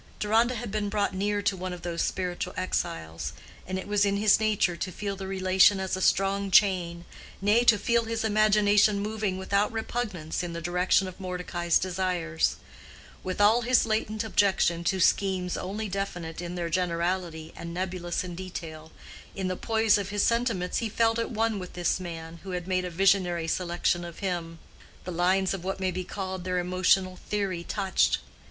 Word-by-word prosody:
Deronda 225 Hz, +4 st, +2 dB
had 235 Hz, -2 st, -5 dB
been 210 Hz, -1 st, -1 dB
brought 205 Hz, 0 st, 0 dB
near 205 Hz, +2 st, -1 dB
to 195 Hz, -, +1 dB
one 185 Hz, 0 st, -5 dB
of 175 Hz, -, -9 dB
those 170 Hz, -1 st, -2 dB
spiritual 180 Hz, -1 st, -2 dB
exiles, 165 Hz, -, -3 dB, 0.3 s
and 185 Hz, 0 st, -2 dB
it 190 Hz, -, -6 dB
was 205 Hz, 0 st, +2 dB
in 200 Hz, 0 st, +2 dB
his 210 Hz, 0 st, +4 dB
nature 210 Hz, -5 st, +1 dB
to 185 Hz, +2 st, -4 dB
feel 200 Hz, +2 st, -4 dB
the 195 Hz, 0 st, -6 dB
relation 190 Hz, +1 st, +4 dB
as 190 Hz, -1 st, -1 dB
a 185 Hz, -, -4 dB
strong 195 Hz, +1 st, +2 dB
chain, 180 Hz, -4 st, +3 dB, 0.3 s
nay, 210 Hz, +4 st, +3 dB
to 225 Hz, -3 st, +6 dB
feel 235 Hz, +3 st, +1 dB
his 225 Hz, 0 st, -2 dB
imagination 210 Hz, -1 st, +4 dB
moving 210 Hz, -2 st, -2 dB
without 200 Hz, +2 st, +1 dB
repugnance 220 Hz, -7 st, -3 dB
in 175 Hz, -1 st, -4 dB
the 170 Hz, -, -4 dB
direction 180 Hz, +3 st, +2 dB
of 185 Hz, +1 st, -9 dB
Mordecai's 180 Hz, -2 st, 0 dB
desires. 180 Hz, -3 st, -1 dB, 0.7 s
With 185 Hz, +1 st, -4 dB
all 215 Hz, +4 st, +5 dB
his 245 Hz, 0 st, +3 dB
latent 215 Hz, -1 st, -1 dB
objection 190 Hz, -5 st, +2 dB
to 190 Hz, -, +1 dB
schemes 185 Hz, 0 st, +2 dB
only 210 Hz, +4 st, -4 dB
definite 175 Hz, -4 st, -4 dB
in 175 Hz, 0 st, -5 dB
their 170 Hz, -1 st, -3 dB
generality 170 Hz, -2 st, -1 dB
and 170 Hz, -, -7 dB
nebulous 175 Hz, -1 st, -3 dB
in 180 Hz, -1 st, -6 dB
detail—in 170 Hz, +1 st, -8 dB
the 185 Hz, -, -1 dB
poise 220 Hz, 0 st, +2 dB
of 200 Hz, -1 st, -4 dB
his 205 Hz, 0 st, 0 dB
sentiments 230 Hz, -6 st, +1 dB
he 230 Hz, -, -2 dB
felt 225 Hz, +1 st, +2 dB
at 230 Hz, -, -1 dB
one 225 Hz, -2 st, 0 dB
with 180 Hz, -1 st, -8 dB
this 175 Hz, +1 st, 0 dB
man 165 Hz, -2 st, -7 dB
who 190 Hz, -1 st, -7 dB
had 175 Hz, 0 st, -7 dB
made 185 Hz, -1 st, 0 dB
a -, -, -3 dB
visionary 180 Hz, -2 st, +2 dB
selection 175 Hz, 0 st, 0 dB
of 170 Hz, -1 st, -8 dB
him: 175 Hz, -4 st, -3 dB, 0.5 s
the 180 Hz, -, -5 dB
lines 185 Hz, +3 st, +2 dB
of 190 Hz, -3 st, -5 dB
what 190 Hz, +1 st, -3 dB
may 190 Hz, -1 st, 0 dB
be 185 Hz, +1 st, -3 dB
called 185 Hz, 0 st, -5 dB
their 185 Hz, 0 st, -1 dB
emotional 185 Hz, +1 st, +2 dB
theory 195 Hz, -4 st, -1 dB
touched. 195 Hz, 0 st, +1 dB
185 Hz, 180 wpm, -27 LUFS, 175-205 Hz, 0.7 s, to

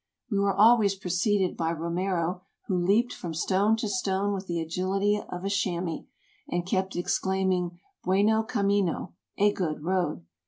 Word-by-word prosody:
We 200 Hz, -, +1 dB
were 200 Hz, -1 st, +2 dB
always 215 Hz, -2 st, +5 dB
preceded 190 Hz, +1 st, 0 dB
by 165 Hz, 0 st, -1 dB
Romero, 175 Hz, +1 st, -1 dB, 0.2 s
who 190 Hz, -, -1 dB
leaped 205 Hz, +8 st, +2 dB
from 165 Hz, -2 st, -6 dB
stone 200 Hz, +6 st, +2 dB
to 225 Hz, -, -2 dB
stone 195 Hz, +1 st, 0 dB
with 195 Hz, -1 st, -5 dB
the 170 Hz, -1 st, -1 dB
agility 195 Hz, +5 st, 0 dB
of 180 Hz, +1 st, -5 dB
a -, -, 0 dB
chamois, 180 Hz, -4 st, -1 dB, 0.4 s
and 175 Hz, 0 st, -1 dB
kept 190 Hz, +1 st, -1 dB
ex 175 Hz, -, 0 dB
claiming 185 Hz, -2 st, 0 dB, 0.3 s
Bitcno 215 Hz, +4 st, +2 dB
camino 200 Hz, -5 st, 0 dB, 0.2 s
(a 205 Hz, +1 st, +4 dB
good 155 Hz, -6 st, -3 dB
road). 175 Hz, -, -1 dB
190 Hz, 155 wpm, -27 LUFS, 175-200 Hz, 0.4 s, always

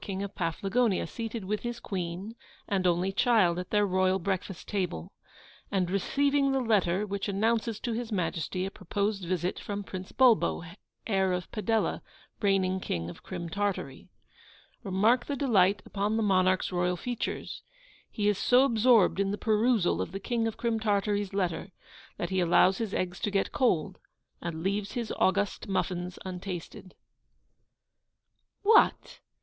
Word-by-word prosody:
King 195 Hz, -1 st, -4 dB
of 200 Hz, -, -6 dB
Paflagonia, 195 Hz, +5 st, 0 dB
seated 225 Hz, -3 st, -5 dB
with 210 Hz, +2 st, -1 dB
his 240 Hz, 0 st, -4 dB
Queen 185 Hz, +2 st, -4 dB, 0.3 s
and 190 Hz, -2 st, +1 dB
only 180 Hz, +2 st, +1 dB
child 195 Hz, -5 st, +3 dB
at 180 Hz, -, -6 dB
their 210 Hz, -1 st, +3 dB
royal 185 Hz, 0 st, +2 dB
breakfast 190 Hz, -1 st, -3 dB
table, 180 Hz, -, -3 dB, 0.6 s
and 185 Hz, -3 st, 0 dB
receiving 275 Hz, +7 st, +2 dB
the 270 Hz, -, +1 dB
letter 205 Hz, -5 st, +2 dB
which 200 Hz, 0 st, -3 dB
announces 220 Hz, +2 st, 0 dB
to 240 Hz, -, -2 dB
His 235 Hz, 0 st, -4 dB
Majesty 180 Hz, -1 st, -2 dB
a 195 Hz, -, -4 dB
proposed 200 Hz, +2 st, -2 dB
visit 180 Hz, +1 st, -1 dB
from 205 Hz, 0 st, -4 dB
Prince 185 Hz, -1 st, -7 dB
Bulbo, 245 Hz, -9 st, +3 dB, 0.4 s
heir 190 Hz, -3 st, +1 dB
of 180 Hz, -1 st, -4 dB
Padella, 220 Hz, 0 st, 0 dB, 0.4 s
reigning 190 Hz, -2 st, +2 dB
King 85 Hz, -, -3 dB
of -, -, -14 dB
Crim 175 Hz, -2 st, -6 dB
Tartary. 185 Hz, -6 st, -3 dB, 0.7 s
Remark 220 Hz, +5 st, +2 dB
the 285 Hz, -, -1 dB
delight 200 Hz, -8 st, +3 dB
upon 205 Hz, +2 st, -1 dB
the 225 Hz, -, +1 dB
monarch's 185 Hz, -2 st, +2 dB
royal 180 Hz, 0 st, 0 dB
features. 245 Hz, +5 st, -4 dB, 0.5 s
He 205 Hz, -1 st, -1 dB
is 210 Hz, -2 st, +2 dB
so 250 Hz, +1 st, +5 dB
absorbed 230 Hz, -6 st, +4 dB
in 200 Hz, 0 st, +1 dB
the 205 Hz, -, -2 dB
perusal 220 Hz, -3 st, +2 dB
of -, -, -5 dB
the 195 Hz, -, -3 dB
King 230 Hz, +2 st, -1 dB
of 225 Hz, -, -4 dB
Crim 230 Hz, -1 st, 0 dB
Tartary's 205 Hz, -1 st, 0 dB
letter, 185 Hz, -1 st, -2 dB, 0.4 s
that 175 Hz, -, -3 dB
he 190 Hz, -, +1 dB
allows 180 Hz, +2 st, +4 dB
his 225 Hz, -4 st, -2 dB
eggs 180 Hz, -1 st, -2 dB
to -, -, -1 dB
get 195 Hz, -1 st, 0 dB
cold, 185 Hz, -, +1 dB, 0.4 s
and 165 Hz, -1 st, -4 dB
leaves 200 Hz, +1 st, -1 dB
his 235 Hz, -2 st, -3 dB
august 195 Hz, +2 st, +1 dB
muffins 180 Hz, -2 st, -2 dB
untasted. 185 Hz, 0 st, -7 dB, 1.7 s
'What! 435 Hz, +2 st, +4 dB
195 Hz, 155 wpm, -29 LUFS, 185-220 Hz, 1.7 s, so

